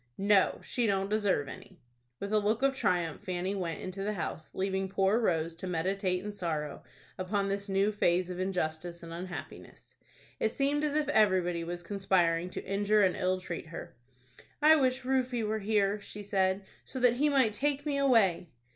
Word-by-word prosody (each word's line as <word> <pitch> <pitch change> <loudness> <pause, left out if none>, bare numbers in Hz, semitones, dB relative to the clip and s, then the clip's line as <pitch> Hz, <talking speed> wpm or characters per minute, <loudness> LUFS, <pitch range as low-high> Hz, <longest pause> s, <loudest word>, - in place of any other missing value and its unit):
"No, 200 -1 +3
she 240 -2 -1
don't 195 0 0
deserve 205 -9 +1
any." - - -11 0.4
With 200 +1 -4
a 215 - +5
look 215 +4 0
of 275 0 +4
triumph 175 - 0
Fanny 185 +1 -2
went 175 -5 -3
into 190 +1 -5
the 210 +2 -1
house, 160 -4 -5
leaving 190 0 -1
poor 195 +3 +2
Rose 165 -7 0
to 185 - -6
meditate 185 +2 -1
in 210 - -4
sorrow 155 -6 -3 0.4
upon 195 +2 -1
this 200 +1 -3
new 195 +2 +2
phase 180 -3 +1
of 180 - -6
injustice 175 -2 -2
and 165 0 -8
unhappiness. 180 +1 -8 0.5
It 220 - +2
seemed 285 +2 +1
as 300 -1 0
if 305 -1 +1
everybody 185 -5 +3
was 175 +1 -5
conspiring 180 -3 +1
to - - -6
injure 205 +2 +2
and 185 -2 +3
ill 185 0 0
treat 170 -3 -6
her. 165 - -8 0.6
"I 310 +1 +7
wish 260 -3 +1
Rufie 255 -2 0
were 215 +1 -1
here," 205 -1 +1
she 205 +1 -8
said, 190 -1 +1 0.2
"so 260 - -6
that 245 -1 +4
he 295 +3 +3
might 260 -7 +3
take 285 +5 0
me 285 -2 0
away." 215 -11 +3
195 Hz, 180 wpm, -30 LUFS, 180-215 Hz, 0.6 s, I